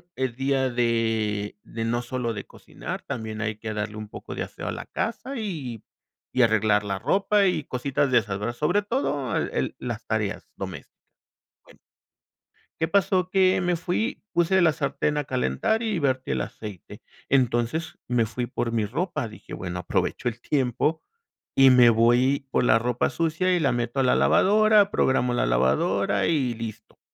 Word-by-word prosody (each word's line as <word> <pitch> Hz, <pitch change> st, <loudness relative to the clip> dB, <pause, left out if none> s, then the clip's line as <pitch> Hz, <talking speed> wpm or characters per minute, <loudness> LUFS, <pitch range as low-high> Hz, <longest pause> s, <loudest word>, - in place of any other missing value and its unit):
es 130 Hz, -2 st, -2 dB
día 135 Hz, 0 st, +1 dB
de 115 Hz, -4 st, 0 dB
de 115 Hz, -, -5 dB
no 120 Hz, +1 st, 0 dB
solo 120 Hz, -1 st, -3 dB
de 100 Hz, -, -6 dB
cocinar, -, -, -8 dB
también 110 Hz, -1 st, -5 dB
hay 110 Hz, 0 st, -2 dB
que 110 Hz, 0 st, -5 dB
darle 105 Hz, 0 st, -4 dB
un 105 Hz, 0 st, -6 dB
poco -, -, -8 dB
de -, -, -2 dB
aseo -, -, -8 dB
a -, -, -1 dB
la -, -, -6 dB
casa, 250 Hz, +4 st, -4 dB
y 150 Hz, -, -5 dB, 0.5 s
y 130 Hz, -, +4 dB
arreglar 110 Hz, -2 st, +3 dB
la 100 Hz, -1 st, -2 dB
ropa, 195 Hz, -, +2 dB
y 155 Hz, -5 st, 0 dB
cositas 135 Hz, +2 st, -1 dB
de 125 Hz, -, +6 dB
esas, 105 Hz, -4 st, -4 dB
¿verdad? 110 Hz, +3 st, -2 dB
Sobre 175 Hz, +10 st, +1 dB
todo 205 Hz, -, -1 dB
el -, -, -1 dB
el -, -, -1 dB
las 115 Hz, -2 st, -5 dB
tareas 110 Hz, -2 st, -2 dB
domésticas. 95 Hz, -7 st, -7 dB, 0.7 s
Bueno. -, -, -19 dB, 1.0 s
¿Qué 160 Hz, -, +1 dB
pasó? 185 Hz, 0 st, +2 dB
Que 190 Hz, -1 st, +4 dB
me 180 Hz, -1 st, +1 dB
fui, 180 Hz, -, -2 dB
puse 175 Hz, +2 st, +3 dB
la 170 Hz, -2 st, +5 dB
sartén 145 Hz, 0 st, -1 dB
a 150 Hz, -, 0 dB
calentar 130 Hz, -, 0 dB
y 220 Hz, -4 st, -1 dB
vertí 130 Hz, -4 st, 0 dB
el 65 Hz, -, 0 dB
aceite. 100 Hz, -, -8 dB, 0.3 s
Entonces 130 Hz, +6 st, 0 dB
me 120 Hz, -2 st, +1 dB
fui 120 Hz, +2 st, -3 dB
por 120 Hz, -1 st, -3 dB
mi 115 Hz, -2 st, 0 dB
ropa, 155 Hz, -, -2 dB
dije: 110 Hz, -, -12 dB
"Bueno, 90 Hz, 0 st, -5 dB
aprovecho 90 Hz, -, -1 dB
el 120 Hz, 0 st, -10 dB
tiempo 140 Hz, +5 st, 0 dB, 0.5 s
y 135 Hz, -1 st, +7 dB
me 125 Hz, -2 st, +7 dB
voy 125 Hz, +5 st, +3 dB
por -, -, +2 dB
la 115 Hz, -, +5 dB
ropa 120 Hz, +1 st, 0 dB
sucia, 170 Hz, +3 st, +1 dB
y -, -, +1 dB
la 145 Hz, -, +2 dB
meto 120 Hz, +2 st, -2 dB
a -, -, +2 dB
la 125 Hz, -, +3 dB
lavadora, 210 Hz, 0 st, +4 dB
programo 125 Hz, -2 st, +2 dB
la 120 Hz, -, +1 dB
lavadora 65 Hz, +3 st, +2 dB
y 135 Hz, -7 st, +1 dB
listo". 110 Hz, -1 st, -8 dB
125 Hz, 175 wpm, -25 LUFS, 110-160 Hz, 1.0 s, y